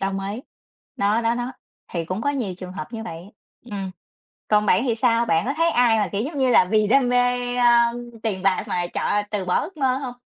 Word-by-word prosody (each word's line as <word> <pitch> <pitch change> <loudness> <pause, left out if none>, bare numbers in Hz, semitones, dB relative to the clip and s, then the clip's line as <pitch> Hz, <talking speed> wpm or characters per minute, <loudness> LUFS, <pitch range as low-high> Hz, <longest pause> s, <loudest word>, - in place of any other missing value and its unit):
Đồng 195 0 -1 0.2
ý, 230 - -6 0.6
đó, 205 +3 +2
đó, 230 0 +2
đó. 245 +1 -3 0.4
Thì 170 -2 -2
cũng 185 +5 -4
có 285 - +1
nhiều 240 -10 -3
trường 185 0 -9
hợp 185 +1 -7
như 225 -1 -5
vậy. 175 -1 -9 0.3
Ừm, 200 -5 -5 0.6
còn 210 0 +3
bạn 195 +2 +3
thì 230 - +1
sao? 230 0 +2
Bạn 165 -6 +1
có 275 - -1
thấy 330 +1 +3
ai 240 -4 +4
mà, 205 -4 0
kiểu, 200 - -1
giống 290 +5 -4
như 260 -1 +3
là, 240 - +6
vì 215 +2 +2
đam 250 +2 +3
mê, 245 0 +1
a, 240 -1 +5
ơm, 240 0 -5
tiền 205 -5 -2
bạc 195 +2 +2
mà 175 -3 -1
chọn 205 +3 -1
từ 205 -3 -2
bỏ 180 - +2
ước 370 0 -8
mơ 265 -3 +2
hông? 255 -3 -6
225 Hz, 240 wpm, -23 LUFS, 195-245 Hz, 0.6 s, là